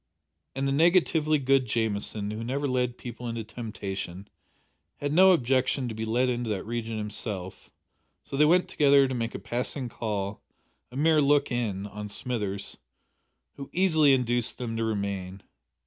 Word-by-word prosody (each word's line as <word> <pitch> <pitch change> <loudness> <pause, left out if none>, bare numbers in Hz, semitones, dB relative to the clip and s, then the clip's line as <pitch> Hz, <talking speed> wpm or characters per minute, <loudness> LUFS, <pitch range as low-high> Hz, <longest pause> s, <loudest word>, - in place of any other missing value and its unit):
And 135 +1 -1
the - - +1
negatively 160 0 +3
good 135 -2 +2
Jamieson, 105 -2 -1
who 110 +1 -5
never 140 +4 -2
led 125 -2 0
people 120 0 -7
into 115 -1 -4
temptation, 100 -4 -6 0.7
had 145 0 -2
no 190 +3 +7
objection 130 -3 +1
to 115 - -4
be 110 +1 -4
led 120 +3 +1
into 120 -2 -1
that 100 -3 -2
region 115 0 -3
himself, 105 -3 -4 0.5
so - - -7
they 145 - +4
went 175 +4 +4
together 140 -2 +4
to 130 - -3
make 115 -2 -3
a - - -1
passing 125 +1 -2
call 105 -3 -4 0.5
a 125 - -8
mere 155 +1 +4
look 145 0 +3
in 105 -5 -2
on 105 +1 -7
Smithers, 105 -2 -4 0.8
who 140 - -8
easily 160 -6 +4
induced 120 -1 0
them 115 -2 -4
to 115 - -1
remain. 100 -3 -3
120 Hz, 160 wpm, -27 LUFS, 105-140 Hz, 0.8 s, no